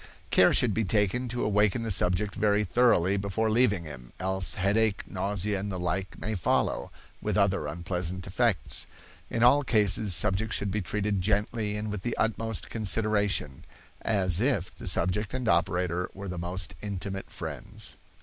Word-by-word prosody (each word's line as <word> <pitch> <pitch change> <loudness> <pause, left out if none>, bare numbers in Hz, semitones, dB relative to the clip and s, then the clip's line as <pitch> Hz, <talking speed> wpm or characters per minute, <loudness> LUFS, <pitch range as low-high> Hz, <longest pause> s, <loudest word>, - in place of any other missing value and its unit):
Care - - +6
should 120 -5 +3
be 110 - 0
taken 105 +5 +1
to 120 +1 -2
awaken 105 +2 +2
the 110 - -2
subject 95 +2 +2
very 105 0 +2
thoroughly 100 -3 +3
before 100 +3 -1
leaving 110 -6 +2
him, 65 -6 -11
else 95 0 0
headache, 100 +2 +1
nausea, 100 +1 -2
or - - -4
the 100 -2 -4
like 90 +2 -3
may 110 - -4
follow, 85 -9 0 0.3
with 105 -1 -1
other 100 -6 +1
unpleasant 90 +2 -4
effects. 100 - 0 0.4
In 115 - 0
all 140 +4 +6
cases 105 -5 +4
subjects 105 +5 +3
should 100 -1 -2
be 105 +2 -1
treated 100 +1 -1
gently 105 +2 -1
and 105 0 -4
with 105 -2 -4
the 120 - -3
utmost 115 -1 -1
consideration, 105 - 0 0.4
as 95 -5 +1
if 120 -9 0
the - - -9
subject 100 +7 0
and 130 -2 -3
operator 90 0 +1
were 100 +1 -7
the 90 -1 -5
most 85 -1 -1
intimate 100 -1 -5
friends. - - -7
100 Hz, 160 wpm, -28 LUFS, 90-110 Hz, 0.4 s, Care